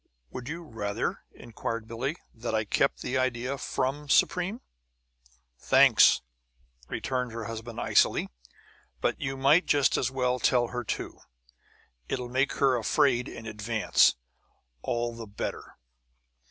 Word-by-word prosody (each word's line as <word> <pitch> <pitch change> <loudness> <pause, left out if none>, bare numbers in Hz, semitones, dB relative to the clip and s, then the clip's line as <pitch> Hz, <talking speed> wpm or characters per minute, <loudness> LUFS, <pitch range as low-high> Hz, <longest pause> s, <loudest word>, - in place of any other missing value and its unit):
"Would 125 +1 -7
you 170 +2 -5
rather," 105 -8 -3
inquired 115 -1 -6
Billie, 125 +6 -3 0.2
"that 115 0 -3
I 110 -1 0
kept - - +1
the 130 +1 -1
idea 130 +1 -1
from 145 +2 -2
Supreme?" 185 - +2 1.0
"Thanks," - - +5 0.7
returned 125 -2 -2
her 115 0 -5
husband, 115 +1 -6
icily, - - +3 0.7
"but - - -1
you 135 0 -3
might 145 +7 +4
just 140 -4 +3
as 125 - 0
well 125 -1 0
tell 120 -1 +2
her, 125 0 -4
too. - - -5 0.9
It'll 125 -2 -3
make 130 +3 +1
her 135 -2 +3
afraid 120 +2 +2
in 115 - -9
advance, 110 +1 +2 0.7
all 120 - -2
the 115 -1 -8
better!" 100 - -6
125 Hz, 125 wpm, -28 LUFS, 115-135 Hz, 1.0 s, Thanks